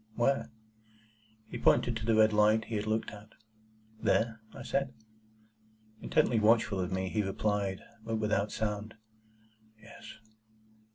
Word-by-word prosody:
"Where?" 135 +3 +1 1.0
He - - -7
pointed 120 -1 +3
to 110 0 -5
the 115 - +4
red 110 0 +5
light 105 +1 +4
he 115 - -5
had 105 0 -2
looked 110 +1 -1
at. 105 +1 -13 0.7
"There?" 110 -1 +1
I - - -9
said. 135 -2 -2 1.1
Intently 115 - +2
watchful 110 -2 +3
of 90 0 -2
me, 95 0 -1
he 105 +3 0
replied 100 -1 -1 0.2
(but 115 0 -2
without 105 -1 0
sound), 105 0 -3 0.8
"Yes." 110 +2 -12
110 Hz, 130 wpm, -31 LUFS, 105-115 Hz, 1.1 s, red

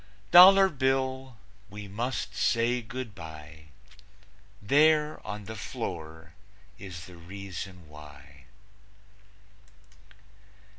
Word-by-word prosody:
Dollar 190 +2 +9
Bill, 130 -4 -2 0.3
we 105 -1 -9
must 120 +6 -4
say 120 +1 +1
good 120 -1 -7
by; 80 -2 -11 0.9
There 150 +6 +2
on 105 0 -7
the 110 - -8
floor 80 -5 -7 0.5
is 90 -4 -9
the 90 -2 -14
Reason 90 0 -9
Why. 75 -2 -15
100 Hz, 85 wpm, -28 LUFS, 80-130 Hz, 0.9 s, Dollar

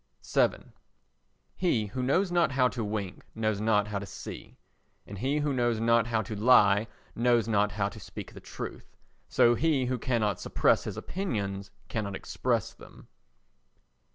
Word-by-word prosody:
vii - - +1 0.8
He 130 - +1
who 115 +6 -4
knows 175 +9 +1
not 175 -5 +2
how 130 -1 +4
to 120 -3 -4
wink 105 -3 -4
knows 110 -2 -1
not 105 -1 +2
how 100 -1 -2
to 100 - -6
see; - - -9 0.5
and 100 -1 -9
he 135 +6 0
who 145 -1 0
knows 120 -3 +1
not 115 0 +3
how 115 -1 0
to 105 +2 -6
lie 105 -2 +5 0.3
knows 120 -2 +2
not 105 -1 +2
how 100 -1 0
to 110 - -11
speak - - -9
the - - -10
truth. - - -8 0.3
So 120 - +5
he 145 0 +1
who 125 0 -1
cannot 110 -6 0
suppress - - +2
his - - -5
opinions 100 - -3 0.2
cannot 100 -3 -3
express - - -1
them. - - -16
115 Hz, 160 wpm, -29 LUFS, 105-125 Hz, 0.8 s, lie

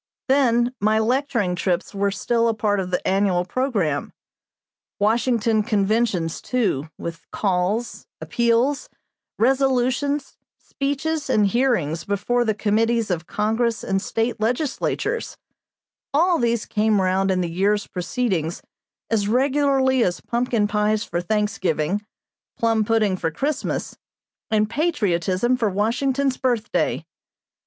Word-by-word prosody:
Then 245 -3 +3
my 215 +1 +2
lecturing 235 -4 +1
trips 180 +1 -1
were 200 0 +1
still 230 +4 0
a 225 - +1
part 210 -2 0
of 185 -1 -3
the 180 - -2
annual 190 -2 +2
programme. 190 - -1 0.8
Washington 225 +1 +2
conventions, 205 -5 0
too, 200 - -1
with 170 -1 -7
calls, 195 +4 -1
appeals, 235 +4 +1 0.5
resolutions, 270 +3 +1 0.2
speeches 285 +2 -3
and 215 -5 +3
hearings 195 - +1
before 205 +6 0
the 220 -3 0
Committees 225 +1 +1
of 170 -2 -2
Congress 225 +2 0
and 195 0 0
State 225 +3 -2
legislatures, 270 - -1 0.8
all 340 +3 +3
these 235 -2 0
came 215 -1 +1
round 190 +1 +1
in 185 -1 +1
the 175 - -1
year's 200 +4 +1
proceedings 180 -3 -2 0.5
as 210 -3 +1
regularly 265 +1 +2
as 175 -3 -1
pumpkin 235 -3 0
pies 210 +1 +1
for 175 -5 -3
Thanksgiving, 190 -2 -1 0.5
plum 225 -1 +2
pudding 215 -3 +1
for 165 - -1
Christmas, 280 - -3 0.5
and 215 -1 +2
patriotism 215 - 0
for 230 -4 0
Washington's 255 +7 0
birthday. 240 -4 0
220 Hz, 115 wpm, -22 LUFS, 195-250 Hz, 0.8 s, Then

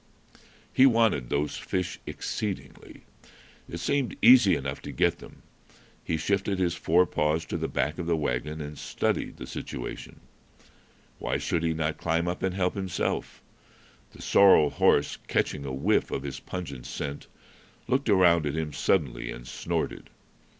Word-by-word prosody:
He 130 - +7
wanted 115 - +2
those 75 +1 -1
fish 90 -2 -3
exceedingly. 105 -3 -5 0.7
It 85 - -5
seemed 135 +8 -1
easy 125 -6 +7
enough 70 +1 -4
to - - -7
get - - +1
them. - - -14 0.6
He 80 - -1
shifted 100 +4 0
his 90 -2 +1
fore 90 +1 +3
paws 75 +1 0
to - - -5
the - - -1
back 75 +4 -2
of 85 - -4
the 85 -1 +2
wagon, 75 +2 -2
and 75 0 -7
studied - - -2
the - - -7
situation. - - -7 1.0
Why - - -1
should 85 - -1
he 80 -1 +1
not 80 -1 -2
climb 85 +1 0
up 90 - -3
and 95 -1 -1
help 90 -1 +1
himself? 95 -3 -3 0.7
The - - -13
sorrel 95 -7 +6
horse, 70 - +2
catching 70 - -1
a 70 - -4
whiff 75 +12 +1
of 65 - -3
his 70 -2 -5
pungent 70 -9 -7
scent, 70 -1 -5 0.6
looked 130 -1 0
around 85 -5 +5
at 70 - -2
him 80 -2 -3
suddenly 65 -5 0
and - - -9
snorted. - - -3
80 Hz, 155 wpm, -27 LUFS, 75-95 Hz, 1.0 s, He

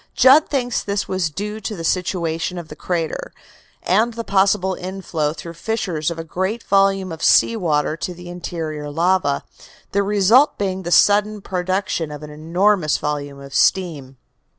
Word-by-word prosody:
Judd 275 +4 +6
thinks 245 -4 -1
this 200 0 -2
was 185 -3 -1
due 210 +6 -5
to 215 0 -5
the 165 - -7
situation 175 -1 -1
of 170 -2 -7
the 150 - -9
crater, 165 -1 -3 0.5
and 220 +5 +2
the 230 - -4
possible 190 -2 +2
inflow 180 -5 -3
through 165 +2 -8
fissures 175 -5 -2
of 170 - -5
a 165 - -4
great 190 +8 -3
volume 195 -1 +2
of 160 - -7
sea 230 - +5
water 155 -6 0
to 180 +1 -5
the 175 0 -11
interior 160 -4 -5
lava, 165 -2 +1 0.5
the 200 - +2
result 205 +7 +4
being 190 -2 -2
the 175 -1 -5
sudden 210 +3 +4
production 185 -3 -2
of 150 0 -8
an 150 - -9
enormous 170 +2 +1
volume 145 -1 -4
of 140 0 -11
steam. 150 -9 +1
180 Hz, 165 wpm, -20 LUFS, 160-200 Hz, 0.5 s, Judd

